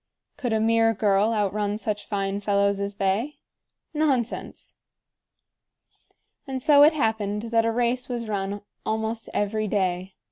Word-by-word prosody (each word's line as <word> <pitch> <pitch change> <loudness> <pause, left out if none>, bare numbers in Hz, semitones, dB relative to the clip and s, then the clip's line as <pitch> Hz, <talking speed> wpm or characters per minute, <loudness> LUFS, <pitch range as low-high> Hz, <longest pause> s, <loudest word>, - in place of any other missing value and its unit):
Could 245 -4 -3
a 220 - +2
mere 225 0 +3
girl 205 +1 +2
outrun 205 -1 0
such 210 -1 -4
fine 195 -1 -2
fellows 200 -1 +1
as 200 0 -3
they? 200 +10 -1 0.6
Nonsense! 275 -6 -1 1.7
And 265 -1 -3
so 285 +1 +5
it 300 +2 +7
happened 220 -6 -1
that 230 -1 +3
a 230 - +2
race 245 +2 0
was 235 -2 -3
run 200 -1 -3 0.2
almost 220 +1 -2
every 215 +1 -1
day. 190 -2 -1
215 Hz, 135 wpm, -25 LUFS, 200-230 Hz, 1.7 s, it